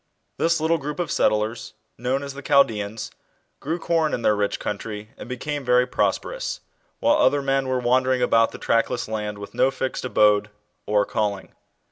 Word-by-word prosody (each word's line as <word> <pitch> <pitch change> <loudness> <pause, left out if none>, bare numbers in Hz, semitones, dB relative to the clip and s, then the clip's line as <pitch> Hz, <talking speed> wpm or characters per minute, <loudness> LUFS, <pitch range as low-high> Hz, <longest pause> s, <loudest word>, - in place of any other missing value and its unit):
This 165 0 +2
little 160 +1 +1
group 150 +4 -5
of 175 - -2
settlers 110 +1 0 0.2
known 130 +4 -1
as 140 -1 -6
the 140 - -9
1 140 - -12
Chaldeans 110 -6 +2 0.5
grew 160 +4 -2
corn 165 -3 +1
in 120 - -6
their 105 - +4
rich 100 -1 -1
country 105 +1 -5
and - - -10
became 145 +3 -4
very 125 0 +4
prosperous, - - -2 0.4
while 290 +1 +3
other 145 - +3
men 135 -1 +1
were 130 0 0
wandering 125 +1 +2
about 115 -1 +4
the - - -8
trackless 115 +1 0
land 105 -1 -3
with 100 0 -9
no 130 - +3
fixed 130 -1 -3
abode 105 -4 +3 0.4
or 105 -1 +3
calling. 105 -2 -2
125 Hz, 175 wpm, -23 LUFS, 105-140 Hz, 0.5 s, their